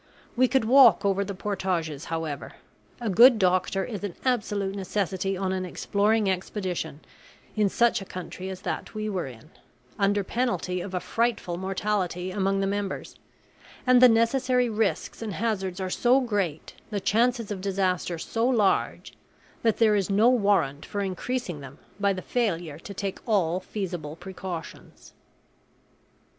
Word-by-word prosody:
We 255 +1 +4
could 265 -3 +2
walk 240 -5 +7
over 200 0 +2
the 200 0 -5
portages, 175 -7 -2
however. 160 -3 -4 0.5
A 240 - -4
good 235 +5 +7
doctor 185 0 +1
is 210 -4 -6
an 200 -4 -4
absolute 205 -6 0
necessity 195 -1 -2
on 190 0 -1
an 185 -1 -2
exploring 205 +4 +1
expedition 180 -4 -3 0.5
in 210 -2 +2
such 235 +1 +2
a - - -7
country 185 +1 -7
as 185 -1 -7
that - - -4
we 215 0 -2
were 185 -7 -2
in, 120 -4 -13 0.5
under 200 0 +2
penalty 210 -6 -1
of 185 0 -6
a - - +1
frightful 225 -3 -1
mortality 185 -1 -2
among 195 0 0
the - - +1
members; 200 0 -3 0.7
and 255 -1 +6
the 255 - +9
necessary 245 +2 +2
risks 220 0 -1
and 220 -3 -4
hazards 195 -4 -2
are 185 -1 -3
so 250 +6 +4
great, 200 - -2 0.2
the 210 -2 -2
chances 230 +2 +1
of 195 -2 -4
disaster 185 -3 -1
so 225 +8 -1
large, 220 -7 +1 0.5
that 225 -2 +2
there 220 -2 +4
is 200 -2 0
no 210 +4 +5
warrant 200 - +2
for 205 - -4
increasing 195 -1 -3
them 135 0 -11 0.2
by 200 0 +3
the 185 -2 -4
failure 170 -10 -1
to 200 +4 -9
take 195 0 -4
all 185 -5 +2
feasible 175 -6 -5
precautions. 180 -2 -8
195 Hz, 150 wpm, -26 LUFS, 185-220 Hz, 0.7 s, the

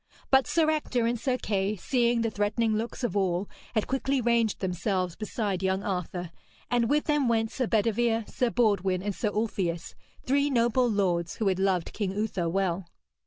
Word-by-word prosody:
But 265 -1 +5
Sir 325 -2 +2
Ector 255 -6 0
and 235 0 0
Sir 255 -1 0
Kay, 200 -3 -1
seeing 235 +3 +1
the 230 -1 0
threatening 215 +2 0
looks 230 +4 -4
of 240 - -1
all, 190 -1 +1 0.3
had 215 - +2
quickly 270 +1 0
ranged 235 -3 +1
themselves 180 -1 -1
beside 210 -3 -2
young 190 0 0
Arthur, 180 -2 -3 0.4
and 240 -1 +2
with 295 +1 +3
them 295 -4 +1
went 225 -1 +1
Sir 255 -3 -1
Bedevere, 225 +1 +1
Sir 250 - 0
Baudwin 195 -6 +1
and 205 0 -1
Sir 210 - -1
Ulfius, 195 -6 -2 0.3
three 280 +2 +2
noble 240 -1 +2
lords 180 -5 0
who 215 -3 +1
had 190 0 0
loved 190 -3 0
King 200 -3 -2
Uther 195 -5 -1
well. 185 -1 -1
215 Hz, 175 wpm, -28 LUFS, 190-240 Hz, 0.4 s, But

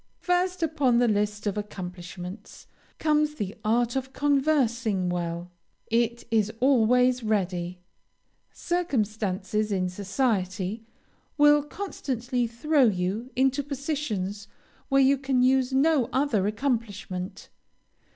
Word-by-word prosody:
First 360 0 0
upon 285 -6 +2
the 245 0 +4
list 210 -1 0
of 205 0 -1
accomplishments, 180 0 -8 0.3
comes 300 -1 +1
the 205 -6 -4
art 235 +3 +1
of 265 0 -3
conversing 260 -9 +1
well. 175 0 -3 0.4
It 235 +1 +1
is 215 -2 +2
always 250 -1 +4
ready. 185 -5 -1 0.7
Circumstances 215 - -1
in 185 -2 0
society 195 0 -1 0.6
will 295 0 +6
constantly 260 - -3
throw 275 +5 +2
you 200 +3 -1
into 270 +2 +2
positions 265 -9 -3 0.4
where 275 -1 +5
you 270 +1 +4
can 265 -2 +1
use 260 0 +3
no 270 -2 +3
other 250 -8 +1
accomplishment. 205 -5 -3
235 Hz, 105 wpm, -26 LUFS, 200-275 Hz, 0.7 s, will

